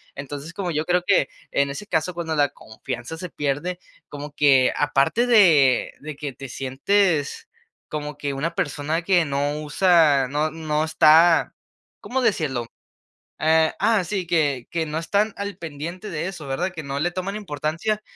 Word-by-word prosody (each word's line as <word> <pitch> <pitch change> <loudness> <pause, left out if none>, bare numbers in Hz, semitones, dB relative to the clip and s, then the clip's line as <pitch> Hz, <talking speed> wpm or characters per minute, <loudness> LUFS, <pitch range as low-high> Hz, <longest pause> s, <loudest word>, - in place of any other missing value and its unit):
Entonces, 145 +3 -7
como 185 -2 -3
yo 155 +1 -1
creo 180 0 +1
que 190 -9 +3 0.2
en 140 0 +1
ese 200 +9 -7
caso, 160 +2 0
cuando 165 -2 -3
la 145 -1 +3
confianza 120 +6 -7
se 180 +2 -6
pierde 150 +5 -2 0.3
como 145 0 -8
que 135 -3 +4
aparte 145 - +2
de 160 - +5
de 150 +1 -7
que 145 -2 -6
te 135 0 -9
sientes 145 +5 0 0.4
como 150 -1 -5
que 140 -1 -3
una 155 +5 -2
persona 150 +2 -2
que 175 -1 +3
no 145 +1 -1
usa, 150 -3 +4
no 150 +3 0
no 155 -1 -1
está, 160 +1 +5 0.4
¿cómo 260 +1 -2
decirlo? 135 - 0 0.7
Eh, 160 0 +3
ah 215 -1 +3
sí, 185 +1 -3
que 145 -7 0
que 165 -1 -1
no 150 +1 -4
están 205 +6 0
al 200 0 -5
pendiente 170 +6 -7
de 165 0 -3
eso, 175 -6 -7
¿verdad? 160 +8 -2
Que 160 - -6
no 140 0 -4
le 175 +3 0
toman 185 +3 -4
importancia 175 +4 -2
155 Hz, 165 wpm, -23 LUFS, 145-180 Hz, 0.7 s, de